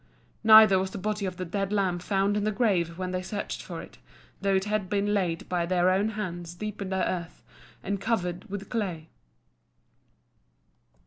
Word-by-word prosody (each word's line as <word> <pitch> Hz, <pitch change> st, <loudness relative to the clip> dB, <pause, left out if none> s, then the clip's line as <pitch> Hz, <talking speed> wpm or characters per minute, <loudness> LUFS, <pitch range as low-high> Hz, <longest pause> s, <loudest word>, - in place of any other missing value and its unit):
Neither 215 Hz, -3 st, +8 dB
was 190 Hz, 0 st, -1 dB
the 190 Hz, -, -7 dB
body 205 Hz, 0 st, -2 dB
of 180 Hz, -1 st, -5 dB
the 185 Hz, -, -3 dB
dead 195 Hz, +3 st, -2 dB
lamb 190 Hz, -4 st, +1 dB
found 195 Hz, +2 st, +1 dB
in 210 Hz, -, 0 dB
the 215 Hz, -, +1 dB
grave 190 Hz, -7 st, +1 dB
when 185 Hz, -1 st, -3 dB
they 185 Hz, 0 st, -2 dB
searched 200 Hz, +3 st, -4 dB
for -, -, -7 dB
it, -, -, -15 dB, 0.4 s
though 195 Hz, 0 st, +2 dB
it 190 Hz, 0 st, +1 dB
had 210 Hz, -3 st, -1 dB
been 205 Hz, 0 st, +1 dB
laid 175 Hz, -5 st, -1 dB
by 175 Hz, -2 st, -1 dB
their 180 Hz, 0 st, +3 dB
own 200 Hz, +3 st, +2 dB
hands 175 Hz, -4 st, -5 dB
deep 210 Hz, +2 st, -6 dB
in 195 Hz, -, -3 dB
the 190 Hz, -1 st, 0 dB
earth, 170 Hz, -2 st, -5 dB, 0.4 s
and 200 Hz, 0 st, -2 dB
covered 180 Hz, -5 st, -1 dB
with 200 Hz, 0 st, -5 dB
clay. 180 Hz, -9 st, -3 dB
190 Hz, 185 wpm, -27 LUFS, 180-205 Hz, 0.4 s, Neither